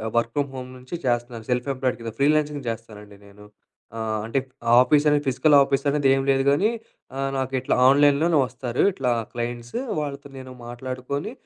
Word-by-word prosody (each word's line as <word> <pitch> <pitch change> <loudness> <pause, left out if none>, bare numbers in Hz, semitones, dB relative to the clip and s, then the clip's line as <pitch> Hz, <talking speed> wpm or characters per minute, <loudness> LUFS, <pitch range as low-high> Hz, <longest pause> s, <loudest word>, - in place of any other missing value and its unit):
Work 115 0 +1
from 145 -1 0
home 130 -1 -7
నుంచి 125 +6 -8
చేస్తున్నాను. 120 -2 -2
Self 125 0 0
employed 130 -1 -1
కింద, 115 -1 -6
ఫ్రీలాన్సింగ్ 150 0 +1
చేస్తానండి 105 -3 -8
నేను. 100 +1 -16 0.5
ఆహ్, 110 -1 -2
అంటే 115 +4 0 0.4
ఆఫీస్ 145 +3 +3
అనేది, 145 0 +2
ఫిజికల్ 135 +3 +3
ఆఫీస్ 135 0 0
అనేది 145 -1 +1
ఏం 135 - +1
లేదు 135 0 +2
గానీ, 185 +10 +2 0.5
ఆహ్, 135 0 -1
నాకు 130 0 -3
ఇట్లా - - 0
ఆన్లైన్‌లోనే 145 +3 +4
వస్తారు 125 -1 -3
ఇట్లా 130 -6 -1 0.2
క్లయింట్సు, 120 - -4 0.2
వాళ్ళతో 140 -1 -5
నేను 130 0 -10
మాట్లాడుకొని. 130 - -5
130 Hz, 160 wpm, -23 LUFS, 120-140 Hz, 0.5 s, ఆన్లైన్‌లోనే